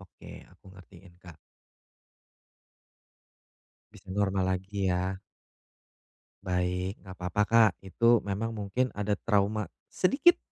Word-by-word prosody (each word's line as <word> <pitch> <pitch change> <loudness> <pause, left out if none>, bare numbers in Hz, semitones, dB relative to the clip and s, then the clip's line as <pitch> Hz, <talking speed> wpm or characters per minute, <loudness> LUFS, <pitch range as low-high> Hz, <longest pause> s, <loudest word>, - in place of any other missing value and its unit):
Oke, 95 -3 -13
aku - - -25
ngertiin, 95 -1 -16
Kak. 85 -4 -13 2.6
Bisa - - -17
normal 100 -2 +1
lagi 95 +1 -3
ya. 90 +1 -1 1.2
Baik, 90 +1 -1
nggak 95 -1 -10
papa, 90 +3 0
Kak, 115 -2 +5
itu 115 +4 +3
memang 105 +3 -2
mungkin 105 +5 -1
ada 105 0 -1
trauma 105 +1 0 0.2
sedikit 275 - +4
100 Hz, 100 wpm, -29 LUFS, 95-105 Hz, 2.6 s, Kak